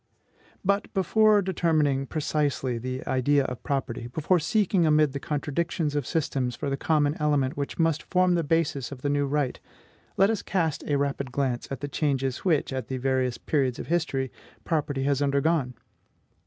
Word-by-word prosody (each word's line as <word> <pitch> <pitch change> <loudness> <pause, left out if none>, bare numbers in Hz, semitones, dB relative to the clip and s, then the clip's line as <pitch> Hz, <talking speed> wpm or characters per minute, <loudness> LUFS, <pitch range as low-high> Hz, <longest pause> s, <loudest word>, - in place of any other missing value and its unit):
But, 200 +1 +1
before 210 +2 +4
determining 155 -7 +1
precisely 145 -5 -1
the 130 +2 -5
idea 135 +2 +2
of 125 -4 -5
property, 130 -4 -3
before 155 +8 +1
seeking 190 +2 +2
amid 150 -2 +3
the 140 - -3
contradictions 150 +2 -2
of 145 -4 -1
systems 130 -6 -1
for 140 - -3
the - - +1
common 150 0 +1
element 145 -3 +1
which 140 -1 -4
must 165 -1 +2
form 185 -1 +3
the 170 -1 +1
basis 145 -4 0
of 130 -2 -9
the 145 - +1
new 145 -1 +1
right, 140 -2 -1 0.6
let 195 +3 +5
us 220 - -2
cast 165 -6 -1
a 145 - +2
rapid 140 -2 -2
glance 130 -3 -1
at 135 -2 -5
the 145 - -3
changes 135 -3 -1
which, 155 -7 +1
at 130 -4 -3
the 130 - -3
various 130 -1 0
periods 135 -5 0
of - - -7
history, 145 -6 0 0.3
property 145 -4 -1
has 140 0 +1
undergone. 140 -1 +1
145 Hz, 170 wpm, -26 LUFS, 135-160 Hz, 0.6 s, let